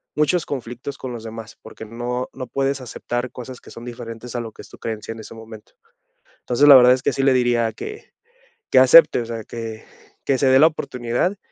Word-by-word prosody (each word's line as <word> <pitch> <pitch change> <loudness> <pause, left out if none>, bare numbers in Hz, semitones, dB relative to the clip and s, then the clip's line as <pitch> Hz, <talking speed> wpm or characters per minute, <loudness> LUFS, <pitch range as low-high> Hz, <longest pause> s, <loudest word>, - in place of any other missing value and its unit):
muchos 155 +3 +1
conflictos 130 0 -6
con 130 - -6
los 115 -2 -8
demás, 115 0 -9
porque - - -11
no 120 +3 -4
no 130 -1 -7
puedes 135 +2 -1
aceptar 120 0 -5
cosas 125 0 -9
que - - -16
son 115 - -10
diferentes 120 0 -8
a - - -1
lo 115 -2 -7
que - - -12
es - - -15
tu - - -14
creencia 110 -1 -5
en 115 - -8
ese 110 - -10
momento. 110 -1 -13 0.7
Entonces, 125 +4 +2
la 145 - +11
verdad 125 -1 +8
es 130 - -2
que - - 0
sí 135 - -1
le 135 -1 +4
diría 120 -2 +2
que 425 - -9 0.6
que - - +5
acepte, - - +7
o - - -5
sea, 115 -2 -6
que 115 -1 -7 0.4
que 135 - +2
se 135 - +1
dé 130 0 +6
la 155 - +8
oportunidad, 125 +4 -2
120 Hz, 220 wpm, -21 LUFS, 115-135 Hz, 0.7 s, la